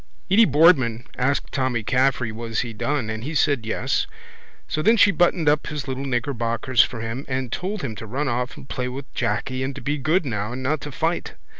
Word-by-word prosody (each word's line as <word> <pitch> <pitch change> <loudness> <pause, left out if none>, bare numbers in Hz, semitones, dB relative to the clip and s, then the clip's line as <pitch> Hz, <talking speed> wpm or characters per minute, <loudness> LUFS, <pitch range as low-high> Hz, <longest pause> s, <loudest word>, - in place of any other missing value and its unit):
Edy 220 +4 +7
Boardman 135 - +4
asked 135 +2 0
Tommy 130 -4 0
Caffrey 130 -1 +1
was 115 0 -3
he 120 -2 -5
done 135 +2 -1
and 110 0 -5
he 155 +5 -4
said 140 -7 +2
yes 130 +4 0 0.6
so 155 - -1
then 225 +8 +4
she 205 - +6
buttoned 175 -2 +2
up 150 +1 +3
his 150 -2 -4
little 135 +1 -3
knickerbockers 120 -2 +1
for 120 -4 -1
him 115 +4 -4
and 130 -2 -2
told 195 +1 -3
him 125 -5 -3
to 110 - -7
run 140 +7 -2
off 125 0 -2
and - - -11
play 125 -2 -3
with 135 +2 -7
Jacky 130 +5 -1
and 135 0 -2
to - - -7
be 145 +4 -1
good 160 +6 +2
now 105 -2 -2
and 130 +1 -5
not 150 +4 0
to 145 - -6
fight. 165 +5 -2
130 Hz, 210 wpm, -23 LUFS, 120-150 Hz, 0.6 s, Edy